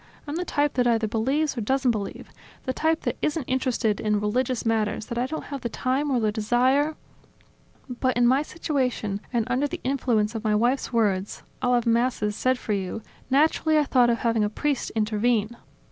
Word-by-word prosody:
I'm 290 - -4
the 355 - -1
type 290 -4 0
that 250 -1 +2
either 225 -2 +2
believes 270 +8 0
or 235 - -3
doesn't 265 +3 +2
believe, 210 -3 -5 0.3
the 260 - -1
type 320 +3 +1
that - - -2
isn't 305 0 0
interested 250 -4 0
in 210 -1 +1
religious 240 +4 -1
matters 220 -1 0
that 235 0 -4
I 250 - 0
don't 315 +3 -5
have 275 - -4
the 235 - -3
time 265 +5 -1
or 260 -3 +2
the 215 -2 +1
desire... 255 +8 +2 0.9
But 255 0 -1
in 245 - +4
my 260 +3 +4
situation, 255 - -2
and 235 -3 0
under 265 +4 +1
the - - -6
influence 240 -5 +1
of 225 - -5
my 215 -1 +2
wife's 240 +5 +1
words: 205 -4 0 0.2
"I'll 250 0 +3
have 240 -1 +1
Masses 230 -3 +1
said 255 +3 +1
for 215 - -3
you," 195 +2 -3 0.3
naturally 310 +3 +3
I 300 - +4
thought 250 -4 +3
of 235 - +2
having 230 -2 +1
a 210 - +1
priest 285 +5 -1
intervene." 220 +1 +1
245 Hz, 195 wpm, -25 LUFS, 220-270 Hz, 0.9 s, in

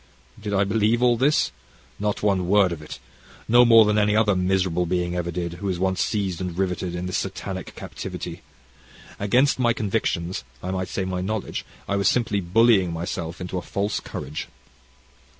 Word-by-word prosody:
Did 105 0 -4
I 100 - +4
believe 110 +4 +2
all 120 -1 +5
this? 135 - +2 0.5
Not 105 0 -1
one 95 -4 +2
word 100 -1 +4
of 80 -3 -5
it, 75 - -8 0.5
no 120 +2 +7
more 115 -2 +7
than 105 0 +2
any 105 0 +3
other 105 -2 +3
miserable 90 -1 +1
being 90 0 -1
ever 85 -1 -2
did 85 0 -3
who 100 - -1
is 90 - -1
once 95 +1 0
seized 95 -5 -1
and 90 -2 -4
riveted 90 -2 -1
in 90 +1 -3
this 90 - -1
satanic - - -5
captivity. - - -7 0.8
Against 125 +8 +3
my 120 -2 +3
convictions, 95 - -1 0.2
I 90 - -2
might 95 -1 -2
say 95 - -3
my 90 -1 -2
knowledge, 105 +2 -3 0.2
I 100 - 0
was 100 -1 +2
simply 110 -5 +1
bullying 95 0 +4
myself 85 0 -4
into 90 0 -3
a - - -7
false 100 +4 -2
courage. 75 +3 -6
95 Hz, 180 wpm, -24 LUFS, 90-105 Hz, 0.8 s, no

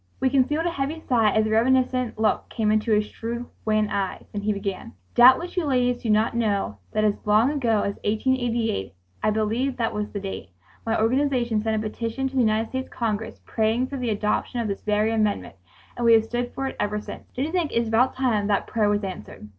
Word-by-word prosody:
We 260 - +1
concealed 290 +4 +2
a 345 - +1
heavy 290 +1 -3
sigh 230 -8 +2
as 215 +1 +2
a 215 - -1
reminiscent 255 +1 +2
look 220 -1 0
came 215 -3 0
into 215 +1 +1
his 210 0 +3
shrewd, 235 +3 -5 0.2
wan 215 -1 +2
eyes, 195 -2 -2
and 205 - -3
he 210 - +1
began: 200 +2 -4 0.2
"Doubtless 255 +8 +6
you 360 - +1
ladies 250 -3 +1
do 230 - -3
not 215 +2 +2
know 200 - -1
that 215 - 0
as 210 -1 +3
long 215 +6 +4
ago 235 -8 +1
as 200 - -3
1888" 225 - 0 0.3
I - - +2
believe 220 +5 0
that 230 -2 -1
was 210 0 -3
the 205 - -5
date 195 - -6 0.4
"my 225 - +1
organization 240 -1 +1
sent 220 0 0
a 215 0 -1
petition 230 +4 -3
to 265 - -8
the 260 - +3
United 220 0 +1
States 260 0 -4
Congress 220 -2 -3
praying 225 +3 +1
for 280 - -4
the 250 -2 -2
adoption 210 +3 -1
of 230 - -1
this 200 -1 -4
very 210 +1 +1
amendment 215 -2 0 0.4
and 240 - -4
we 230 -1 +6
have 225 -1 +5
stood 245 +2 -3
for 270 - -2
it 265 - -4
ever 210 0 -1
since... - - -10
." - - -34
"Don't 260 - -1
you 315 - -4
think 345 -4 0
it - - -6
is 235 0 +1
about 225 +4 +2
time 230 -6 +1
that 200 -1 +1
prayer 215 -2 +1
was 205 0 0
answered?" 175 - -7
225 Hz, 225 wpm, -24 LUFS, 210-250 Hz, 0.4 s, Doubtless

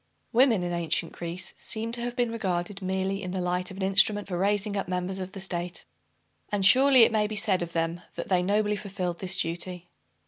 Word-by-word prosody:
Woman, 235 -6 +4
in 175 0 -2
ancient 170 -3 -1
Greece, 175 +1 -5
seems 225 +1 -1
to 240 - -2
have 245 0 -4
been 240 -2 0
regarded 195 -3 -3
merely 190 +1 -2
in 185 - -5
the 185 +1 -3
light 180 0 -1
of 190 - -10
an 195 - -3
instrument 200 +2 +4
for 185 - -4
raising 205 +2 0
up 195 - -2
members 180 +1 -2
of 185 0 -6
the 195 - -7
state. 180 -2 -3 0.7
And 200 -2 +1
surely 260 +3 +7
it - - +4
may 215 -1 +1
be 215 - -5
said 195 -3 +2
of 170 -1 -5
them 165 +1 -1
that - - -5
they 185 -2 +2
nobly 210 +3 +1
fulfilled 185 -4 -4
this 190 0 0
duty. 175 +1 -3
190 Hz, 215 wpm, -27 LUFS, 180-210 Hz, 0.7 s, surely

